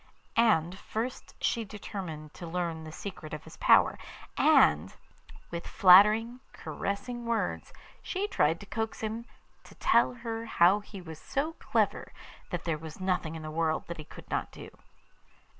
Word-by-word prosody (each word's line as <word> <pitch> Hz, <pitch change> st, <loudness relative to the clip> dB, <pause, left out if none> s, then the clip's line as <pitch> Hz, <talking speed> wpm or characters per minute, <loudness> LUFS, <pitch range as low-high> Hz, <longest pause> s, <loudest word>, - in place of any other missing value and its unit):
And 190 Hz, -6 st, +3 dB
first 230 Hz, +5 st, -5 dB
she 230 Hz, -, 0 dB
determined 185 Hz, -7 st, -7 dB
to 175 Hz, -, -8 dB
learn 165 Hz, -2 st, -3 dB
the 155 Hz, -, -8 dB
secret 155 Hz, -3 st, -7 dB
of 150 Hz, -, -9 dB
his -, -, -12 dB
power, -, -, +5 dB, 0.4 s
and, 75 Hz, +1 st, +4 dB, 0.6 s
with 170 Hz, 0 st, -5 dB
flattering, 210 Hz, +6 st, +6 dB
caressing 240 Hz, +4 st, -4 dB
words, 230 Hz, -1 st, -1 dB, 0.3 s
she 395 Hz, +2 st, -2 dB
tried 170 Hz, -, +2 dB
to -, -, -9 dB
coax 220 Hz, +2 st, -4 dB
him 220 Hz, +2 st, -3 dB, 0.4 s
to -, -, -16 dB
tell -, -, +3 dB
her 225 Hz, 0 st, -3 dB
how 185 Hz, 0 st, +5 dB
he 205 Hz, -2 st, -10 dB
was 160 Hz, -3 st, -9 dB
so 290 Hz, +4 st, -2 dB
clever -, -, 0 dB, 0.4 s
that 175 Hz, -3 st, -3 dB
there 160 Hz, -3 st, -1 dB
was 160 Hz, +1 st, -9 dB
nothing 180 Hz, -4 st, -1 dB
in 160 Hz, -, -7 dB
the 155 Hz, -, -5 dB
world 160 Hz, 0 st, 0 dB
that 170 Hz, -, -7 dB
he -, -, -6 dB
could 150 Hz, -, -13 dB
not -, -, -1 dB
do. -, -, -11 dB
185 Hz, 160 wpm, -29 LUFS, 160-225 Hz, 0.6 s, flattering